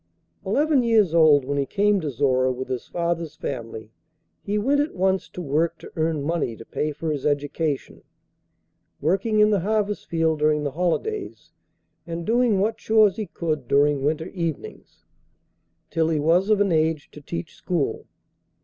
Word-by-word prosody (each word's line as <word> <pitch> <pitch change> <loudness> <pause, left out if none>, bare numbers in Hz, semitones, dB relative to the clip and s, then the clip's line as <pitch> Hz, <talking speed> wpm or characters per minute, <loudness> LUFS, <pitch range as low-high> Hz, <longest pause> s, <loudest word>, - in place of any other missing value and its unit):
Eleven 295 -2 +2
years 220 -7 +3
old 155 -5 +5
when 140 +1 -1
he 140 - +1
came 205 -1 +2
to 155 - -2
Zorra 130 -1 +1
with 130 +1 -5
his 125 -2 -4
father's 170 -2 -2
family, 115 -5 -6 0.5
he 205 +1 -2
went 275 +7 +2
at 295 - -3
once 190 0 0
to 180 - -7
work 160 +3 0
to - - -12
earn 160 -2 0
money 155 -6 -1
to 115 - -12
pay 150 - -2
for 155 +2 -3
his 145 -3 -3
education, 145 0 -2 1.0
working 195 +7 +1
in 210 0 +5
the 205 - +3
harvest 210 +2 -1
field 160 -2 0
during 150 0 +2
the 145 - -2
holidays, 180 - -3 0.6
and 170 0 -5
doing 235 -3 +2
what 220 +3 0
chores 215 -3 +3
he 215 -3 -3
could 155 -5 -3
during 140 0 +3
winter 160 +4 -1
evenings, 170 -5 -6 0.9
till 160 -1 +1
he 160 -2 +1
was 170 +7 +2
of 215 -2 +4
an 200 -2 +2
age 160 -1 0
to 150 - -12
teach 165 +3 -6
school. 170 -6 -2
165 Hz, 165 wpm, -24 LUFS, 145-200 Hz, 1.0 s, old